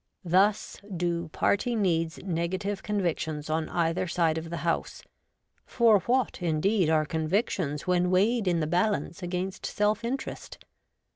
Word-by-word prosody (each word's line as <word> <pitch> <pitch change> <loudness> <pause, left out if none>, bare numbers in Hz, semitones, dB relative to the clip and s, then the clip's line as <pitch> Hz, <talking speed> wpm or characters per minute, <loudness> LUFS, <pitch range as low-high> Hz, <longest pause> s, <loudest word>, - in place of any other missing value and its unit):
Thus 195 +4 +2 0.2
do 170 0 -1
party 205 +9 0
needs 165 -6 0
negative 185 +3 -2
con 210 -1 -2
victions 155 -3 -2
on 160 0 -1
either 170 +2 0
side 165 -2 +1
of 165 0 -8
the 170 0 -5
House; 165 - -2 0.6
for 230 -4 +4
what, 245 -2 0
indeed, 175 +2 +1
are 155 -1 +3
convictions 160 - -1
when 180 -1 +2
weighed 205 +4 +2
in 170 -2 +2
the - - +1
balance 180 +2 0
against 180 +1 -4
self 210 +1 0
interest 255 +4 -5
180 Hz, 140 wpm, -28 LUFS, 165-205 Hz, 0.6 s, for